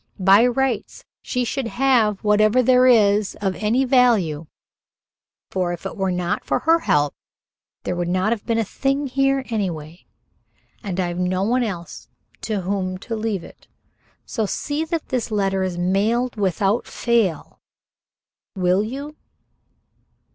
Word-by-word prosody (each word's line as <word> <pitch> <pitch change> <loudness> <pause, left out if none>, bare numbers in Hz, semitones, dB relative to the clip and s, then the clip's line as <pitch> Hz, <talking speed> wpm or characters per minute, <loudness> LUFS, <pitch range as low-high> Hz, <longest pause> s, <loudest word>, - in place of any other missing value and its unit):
By 195 +5 +5
rights 250 -2 -2 0.2
she 250 - -2
should 260 +1 -2
have 235 -5 +2
whatever 215 +4 +4
there 255 +1 +5
is 210 -4 +4
here 205 - -1
of 190 - -1
any 240 +6 +2
value, 215 - +2 1.0
for, 180 -2 -1
if 175 - -9
it 195 - -5
were 190 -3 -1
not 180 0 -2
for - - 0
her 330 +1 +3
help, 145 - +1 0.7
there 180 - -2
would 175 0 -2
not 185 +4 +1
have 230 -3 -2
been 230 -1 -1
a 225 - +2
thing 275 +6 -1
here 270 0 +1
anyway, 175 -6 -4 0.8
and 190 -3 -4
I've 175 -1 -2
no 185 +1 0
one 245 +5 +1
else 180 -8 -5 0.3
to 215 -3 -2
whom 185 0 -2
to 225 +4 -5
leave 215 -5 -2
it - - -15 0.6
so 220 -4 -2
see 295 +9 -2
that 330 -1 -4
this 250 -3 -2
letter 195 -3 0
is 185 -2 -2
mailed 210 +8 0
without 200 +2 0
fail, 225 -10 -1 1.0
will 185 +1 +2
you?" 280 +7 -6
210 Hz, 145 wpm, -21 LUFS, 185-250 Hz, 1.0 s, By